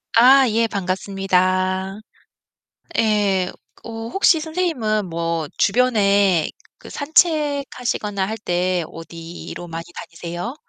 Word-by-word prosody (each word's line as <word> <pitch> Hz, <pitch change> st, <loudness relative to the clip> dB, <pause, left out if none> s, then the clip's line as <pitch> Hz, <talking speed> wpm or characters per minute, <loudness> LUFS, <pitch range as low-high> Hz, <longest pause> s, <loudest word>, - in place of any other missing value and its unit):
아 260 Hz, +3 st, +7 dB
예 225 Hz, +1 st, +2 dB
반갑습니다. 190 Hz, 0 st, 0 dB, 1.0 s
예. 205 Hz, -4 st, +2 dB, 0.3 s
어 -, -, -9 dB, 0.2 s
혹시 385 Hz, -4 st, +4 dB
선생님은 310 Hz, -, -1 dB
뭐 165 Hz, -1 st, -2 dB
주변에 200 Hz, -7 st, +3 dB, 0.3 s
그 -, -, -13 dB
산책하시거나 285 Hz, -, 0 dB
할 220 Hz, +2 st, -4 dB
때 180 Hz, -3 st, 0 dB
어디로 165 Hz, +1 st, -9 dB
많이 165 Hz, 0 st, -6 dB
다니세요? 175 Hz, +8 st, -6 dB
200 Hz, 210 characters per minute, -21 LUFS, 180-245 Hz, 1.0 s, 아